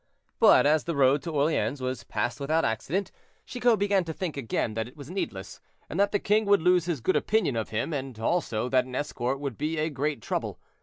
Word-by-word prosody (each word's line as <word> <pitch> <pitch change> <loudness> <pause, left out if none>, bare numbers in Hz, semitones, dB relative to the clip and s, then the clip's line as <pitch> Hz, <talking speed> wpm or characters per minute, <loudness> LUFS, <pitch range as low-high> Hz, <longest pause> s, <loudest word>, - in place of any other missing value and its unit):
But - - +6
as 155 +1 +3
the 170 - -2
road 140 +1 +4
to 170 - -5
Orleans 145 -1 0
was 130 -1 -3
passed 110 +5 -2
without 155 +4 +1
accident, 175 - -2 0.3
Chicot 245 -2 +2
began 200 -1 +2
to 160 - -4
think 175 -1 -4
again 115 -4 -2
that 110 +1 -3
it 125 - -16
was 145 +2 -9
needless, 105 - -5 0.3
and 170 - -5
that 200 0 +3
the 205 - +2
king 210 +2 +1
would 200 -4 +3
lose 180 -1 +4
his 165 -7 -2
good 185 - +1
opinion 215 - +1
of 110 -1 -2
him, 110 +9 -2
and 135 -4 -4
also 115 -2 -1
that 130 -1 +3
an 130 0 -8
escort 135 -1 -2
would 140 -6 -5
be 155 +2 -1
a 155 +1 0
great 145 0 -2
trouble. - - -3
145 Hz, 220 wpm, -27 LUFS, 130-180 Hz, 0.3 s, But